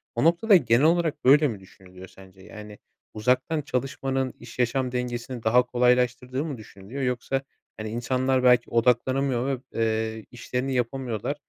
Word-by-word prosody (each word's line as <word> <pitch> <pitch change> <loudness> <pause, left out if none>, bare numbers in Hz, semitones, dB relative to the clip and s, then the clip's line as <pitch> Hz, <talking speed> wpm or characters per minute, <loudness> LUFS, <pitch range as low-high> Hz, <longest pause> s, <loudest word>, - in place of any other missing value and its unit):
O 120 - 0
noktada 170 +6 +4
genel 125 -6 +3
olarak 165 -1 +1
böyle 145 +3 +6
mi 110 -7 -5
düşünülüyor 95 -1 -15
sence? 95 0 -17
Yani 105 +1 -11 0.4
uzaktan 125 +7 0
çalışmanın 135 -1 -2
iş 120 +1 -13
yaşam 125 +1 0
dengesini 125 -1 -4
daha 120 +3 +4
kolaylaştırdığı 125 +2 +1
mı 145 -5 -5
düşünülüyor 110 +4 -9
yoksa 125 +1 -1 0.4
hani 110 0 -5
insanlar 130 +3 0
belki 125 -1 +4
odaklanamıyor 125 +2 +1
ve, 135 -3 -2 0.2
eee, 110 -1 -1
işlerini 125 +2 -3
yapamıyorlar. 125 0 -2
125 Hz, 140 wpm, -25 LUFS, 115-135 Hz, 0.4 s, böyle